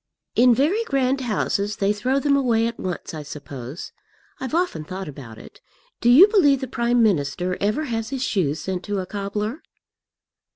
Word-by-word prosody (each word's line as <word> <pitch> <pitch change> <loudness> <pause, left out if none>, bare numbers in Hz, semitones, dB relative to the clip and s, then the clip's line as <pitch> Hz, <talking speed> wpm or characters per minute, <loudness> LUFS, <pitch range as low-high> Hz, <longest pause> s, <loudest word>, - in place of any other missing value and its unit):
"In 245 0 +5
very 335 - +2
grand 270 - 0
houses 210 -3 -1
they 200 +1 +1
throw 255 +6 0
them 280 0 +2
away 235 -5 +2
at 230 0 -4
once, 180 -2 -5
I 155 - -5
suppose. 140 0 -8 0.5
I've 260 +4 -3
often 350 - 0
thought 185 +4 -6
about 135 -6 -10
it. - - -14 0.4
Do 240 - +2
you 300 +11 +9
believe 300 -11 +4
the 265 - -4
Prime 240 -1 +1
Minister 180 -2 0
ever 210 +9 0
has 225 -5 -3
his 265 -1 -3
shoes 160 - 0
sent 185 -2 -3
to 205 -1 -2
a 185 - -2
cobbler?" 210 - -4
220 Hz, 175 wpm, -23 LUFS, 185-265 Hz, 0.5 s, you